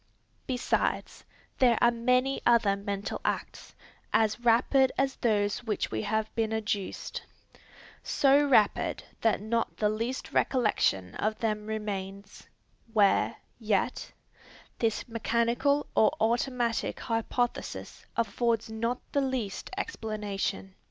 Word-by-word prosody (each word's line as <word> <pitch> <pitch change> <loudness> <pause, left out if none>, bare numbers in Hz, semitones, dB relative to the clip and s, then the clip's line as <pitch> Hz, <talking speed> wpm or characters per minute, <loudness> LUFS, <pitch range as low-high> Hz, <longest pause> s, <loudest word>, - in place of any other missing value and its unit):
Besides, 255 -1 -1 0.3
there 245 -3 +5
are 240 - +5
many 250 +3 +1
other 230 -4 +4
mental 200 0 -4
acts, - - -4 0.4
as 220 0 +2
rapid 245 +3 +4
as 270 0 +1
those 205 -1 +1
which 220 -4 -1
have 215 - -1
been 225 -1 0
adduced, 210 -3 -3 0.8
so 280 +1 +4
rapid 220 -7 +3 0.2
that 225 -3 +2
not 230 +2 -1
the 210 - +2
least 230 +5 -3
recollection 100 - +1
of 215 +1 -1
them 215 -2 -2
remains, 200 -2 -5 0.4
where, 205 -3 +3 0.2
yet, 215 +1 -1 0.7
this 225 +1 0
mechanical 235 +5 +1
or 220 - +5
automatic 235 0 0
hypothesis 235 +1 -2
affords 230 0 0
not 230 +3 -1
the 285 - +2
least 255 -7 -3
explanation. 210 - -3
225 Hz, 105 wpm, -29 LUFS, 210-245 Hz, 0.8 s, there